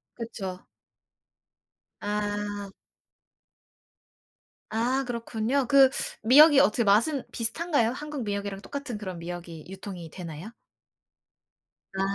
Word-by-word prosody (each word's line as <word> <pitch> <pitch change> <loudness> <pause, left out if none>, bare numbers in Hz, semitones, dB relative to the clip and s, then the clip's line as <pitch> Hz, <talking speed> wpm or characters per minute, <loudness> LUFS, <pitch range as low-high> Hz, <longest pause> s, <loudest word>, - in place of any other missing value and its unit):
그쵸. 195 -6 -6 1.4
아. 205 -1 -3 2.0
아 245 +5 +1
그렇군요. 240 +2 -1
그 270 +1 +6 0.3
미역이 275 +5 +8
어떻게 215 +4 +3
맛은 235 +8 +3
비슷한가요? 240 +1 0
한국 295 +1 -5
미역이랑 200 -2 -3
똑같은 275 -1 -6
그런 185 -4 -6
미역이 170 -2 -7
유통이 185 -3 -8
되나요? 170 +4 -8 1.5
아. - - 0
220 Hz, 210 characters per minute, -27 LUFS, 195-255 Hz, 2.0 s, 미역이